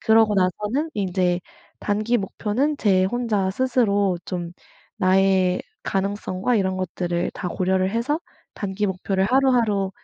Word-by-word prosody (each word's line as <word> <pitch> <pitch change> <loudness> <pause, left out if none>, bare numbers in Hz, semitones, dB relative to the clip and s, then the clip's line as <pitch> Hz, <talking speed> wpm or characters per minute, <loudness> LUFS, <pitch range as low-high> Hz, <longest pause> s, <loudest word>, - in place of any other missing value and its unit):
그러고 220 -1 +4
나서는 210 - 0
인제 180 -2 0 0.4
단기 215 +3 +1
목표는 230 +8 -1
제 190 -7 +3
혼자 210 -3 0
스스로 205 -5 +1
좀 175 -2 -4 0.5
나의 185 -1 +3 0.2
가능성과 195 +2 -1
이런 190 -2 0
것들을 175 -1 -2
다 180 - -4
고려를 185 +1 0
해서 235 +8 0 0.4
단기 200 +1 -2
목표를 190 +1 -1
하루하루 235 -5 +2
195 Hz, 275 characters per minute, -23 LUFS, 185-225 Hz, 0.5 s, 그러고